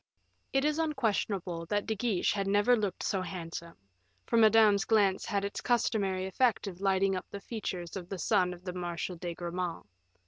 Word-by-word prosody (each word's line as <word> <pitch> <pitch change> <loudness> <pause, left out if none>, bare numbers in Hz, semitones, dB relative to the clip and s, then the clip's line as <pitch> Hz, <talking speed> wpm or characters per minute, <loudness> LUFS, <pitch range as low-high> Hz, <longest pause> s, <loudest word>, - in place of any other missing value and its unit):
It 270 +1 +2
is 300 +1 +1
unquestionable 205 - -1
that 205 +1 0
De 220 - 0
Guiche 215 -4 +1
had 195 -1 -1
never 205 +5 +4
looked 205 -5 -2
so 195 - 0
handsome, 170 -2 -6 0.5
for - - -1
Madame's 220 -2 +6
glance 200 -4 +2
had 200 -2 -1
its 200 - -4
customary 200 -6 +1
effect 220 +4 +1
of 190 -2 -7
lighting 195 0 +2
up 185 - -5
the 200 - -6
features 190 -6 -5
of 180 -2 -6
the 195 - -4
son 180 0 +2
of 180 0 -10
the 180 -1 -5
Marshal 175 0 -4
de 170 0 -5
Gramont. 175 -2 -4
195 Hz, 180 wpm, -31 LUFS, 180-215 Hz, 0.5 s, Madame's